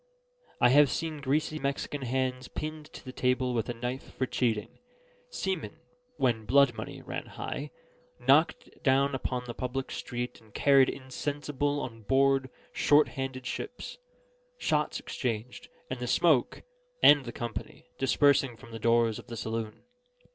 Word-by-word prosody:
I 125 - +6
have 145 +2 +6
seen 155 0 -3
greasy 150 +3 0
Mexican 140 +1 -2
hands 130 0 -1
pinned 155 0 -6
to - - -11
the 130 - -6
table 125 0 +1
with 115 0 -1
a 120 - -2
knife 125 +3 -5
for 130 - 0
cheating, 115 -4 -1 0.5
seamen 190 - -3 0.4
(when 115 -4 +1
blood 140 +4 +5
money - - -7
ran - - -5
high) - - -5 0.5
knocked - - +2
down 140 -1 +3
upon 125 -1 -2
the 120 - -5
public 130 +2 -4
street 120 -1 -5
and 110 -2 -22
carried 135 -2 +5
insensible 145 +1 -2
on 115 -4 -6
board 135 +3 +3 0.2
short 150 +1 +4
handed 135 -2 -5
ships, 245 - -6 0.6
shots - - 0
exchanged, 120 -2 -4 0.2
and - - -5
the - - -3
smoke - - +3 0.4
(and 145 -2 +8
the 120 - -5
company) 120 -1 -6
dispersing 135 -2 +3
from 115 - -14
the 115 - -6
doors 115 -1 +3
of - - -13
the 115 - -6
saloon. 110 -1 -4
130 Hz, 145 wpm, -29 LUFS, 120-140 Hz, 0.6 s, and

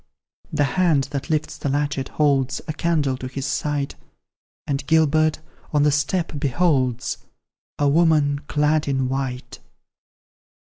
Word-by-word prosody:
The 145 - +1
hand 145 -3 +2
that 140 +2 -4
lifts 155 -1 -1
the 145 - -2
latchet, 145 -1 -1
holds 135 -3 +1
A 155 - -2
candle 150 -5 0
to 130 - -6
his 135 +1 -5
sight, 145 0 -1 0.7
And 140 -2 -2
Gilbert, 155 0 +3 0.3
on 145 -1 +3
the 150 - +4
step, 150 +2 -1
beholds 130 -4 +1 0.6
A 145 - +2
woman, 145 -2 +3
clad 150 0 +1
in 135 -2 0
white. 130 -1 -4
145 Hz, 130 wpm, -22 LUFS, 135-155 Hz, 0.7 s, the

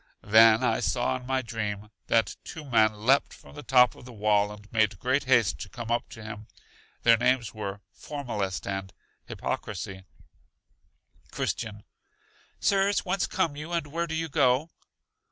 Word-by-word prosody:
Then 110 +1 +6
I - - +2
saw 65 0 0
in 125 - -12
my 130 0 0
dream 105 -3 -4 0.2
that 115 -1 +2
two 160 -3 -8
men 110 -4 +3
leapt 135 +3 +3
from - - -16
the 145 - -8
top 125 -2 +5
of - - -15
the 125 - -11
wall 105 -2 +2
and 105 0 -13
made 110 -3 +2
great 130 +7 0
haste 120 -6 +3
to 100 - -7
come 120 0 -6
up 120 - 0
to 115 - -10
him. 110 0 -8 0.6
Their 115 -1 +6
names 125 -1 +1
were 100 -2 -5
Formalist 110 -10 -4
and 95 -1 -4 0.4
Hypocrisy. 95 -1 -5 1.2
Christian. 105 -3 -3 0.8
Sirs, 200 0 +2
whence 190 +1 0
come 155 -3 0
you, 155 +4 -7
and 170 -3 0
where 165 +4 -3
do 160 - -3
you 165 0 -1
go? 135 +2 +2
115 Hz, 160 wpm, -27 LUFS, 105-135 Hz, 1.2 s, Then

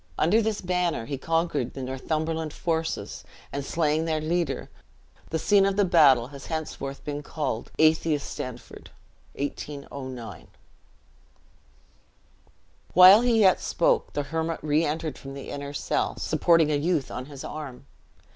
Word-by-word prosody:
Under 205 +9 +3
this 220 -1 -1
banner 180 -8 -1
he 140 +2 -5
conquered 165 -5 -1
the 135 - -5
Northumberland 155 +4 -3
forces, 160 -1 -3 0.3
and 140 0 -3
slaying 155 +1 0
their 160 -1 0
leader, 160 -2 -1 0.6
the 160 - -1
scene 200 +4 +4
of 195 0 +1
the 205 0 +3
battle 140 -9 +5
has 140 -1 -10
henceforth 150 -4 -5
been 145 0 -4
called 145 -6 -4
Atheistanford. 150 -6 -1 0.5
(1809.) 140 -4 -6 2.5
While 185 +4 +10
he 235 -2 +3
yet 190 -2 +5
spoke, - - +1
the 145 - -1
hermit 160 +3 -2
re 155 +1 +2
entered 155 0 -3
from 135 0 -9
the 140 - -8
inner 140 0 -5
cell, 145 - -1
supporting 165 -3 +3
a 145 - +2
youth 155 -1 0
on 125 +1 -6
his 140 -2 -9
arm. 145 -5 -7
155 Hz, 135 wpm, -26 LUFS, 140-165 Hz, 2.5 s, While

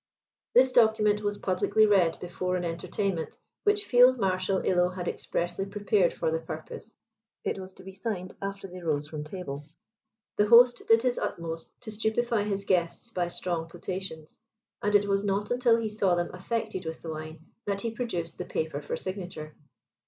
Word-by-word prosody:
This 255 +1 +6
document 220 -3 +4
was 205 -1 -1
publicly 195 +3 +3
read 190 -6 +3
before 180 +1 -2
an 180 -1 -1
entertainment, 170 +1 -2 0.3
which 415 0 +3
Field 250 +1 +6
Marshal 190 -2 +1
Illo 180 -1 +3
had 180 -1 -5
expressly 175 +3 -2
prepared 200 -2 +2
for 160 - -1
the 160 - 0
purpose; 160 +7 -8 0.5
it - - -2
was 190 0 -8
to - - -14
be 190 0 -9
signed, 190 -3 -4
after 195 0 -4
they 180 0 -9
rose 150 -3 0
from 150 -1 -5
table. 150 -4 -6 0.7
The 210 - +4
host 240 +2 +7
did 225 +1 +5
his 250 -1 +1
utmost 165 -1 -4
to 225 -3 -7
stupify 220 0 0
his 200 -1 -2
guests 180 +5 0
by 180 -4 0
strong 170 -1 -3
potations; 180 -3 -6 0.4
and 205 0 +1
it 205 0 +5
was 200 0 +1
not 205 +1 -1
until 245 -2 +4
he 225 -1 -2
saw 200 -4 +2
them 175 0 -2
affected 215 +1 -3
with 160 - -6
the 165 - -4
wine, 155 +1 -8 0.2
that 200 -1 0
he 230 - -2
produced 180 -9 -4
the - - -3
paper 155 -2 -2
for 145 - -3
signature. 180 -5 -6
190 Hz, 175 wpm, -28 LUFS, 175-215 Hz, 0.7 s, host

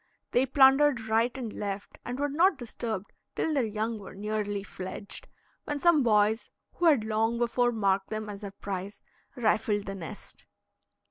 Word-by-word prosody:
They 255 +2 +3
plundered 270 0 +5
right 225 +2 +3
and 235 -5 -5
left, 200 -1 -5
and 245 +1 -4
were 290 +1 +1
not 335 +4 +3
disturbed 225 -4 -5 0.2
till 320 - 0
their 265 -6 +1
young 220 +1 -2
were 190 -2 -10
nearly 205 0 -2
fledged, 195 +1 -7 0.4
when 295 -1 -2
some 340 -1 +5
boys, 215 -2 +3 0.2
who 350 - -1
had 290 -9 +5
long 220 +2 +1
before 240 +1 +2
marked 195 -3 +1
them 215 0 -4
as 205 -1 -7
their 200 - -5
prize, 195 0 -6 0.3
rifled 215 -3 +1
the 195 - -4
nest. 180 -5 -9
220 Hz, 160 wpm, -29 LUFS, 205-255 Hz, 0.4 s, plundered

